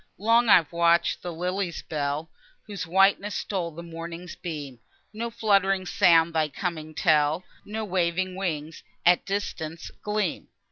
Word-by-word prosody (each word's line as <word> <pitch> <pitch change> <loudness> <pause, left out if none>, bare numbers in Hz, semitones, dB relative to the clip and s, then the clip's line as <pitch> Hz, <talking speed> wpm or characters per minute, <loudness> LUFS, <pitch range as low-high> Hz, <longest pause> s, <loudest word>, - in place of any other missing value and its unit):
Long 230 +3 +3
I've 170 -6 +6
watch'd 170 0 +3
i' - - -33
the 175 - -5
lily's 180 +1 -3
bell, 150 +1 -3 0.3
Whose 200 -6 -6
whiteness 195 +3 +3
stole 185 -4 -2
the 165 +1 -9
morning's 170 +1 -7
beam; 145 -7 -6 0.3
No 230 +2 -3
fluttering 195 -4 +2
sounds 170 -4 +4
thy 155 -1 +1
coming 155 0 -5
tell, 155 +1 +2 0.2
No 215 +1 -4
waving 185 0 0
wings, 160 -5 -4 0.2
at 175 +1 +5
distance, 170 -5 -4
gleam. 210 -4 -2
175 Hz, 140 wpm, -26 LUFS, 160-195 Hz, 0.3 s, I've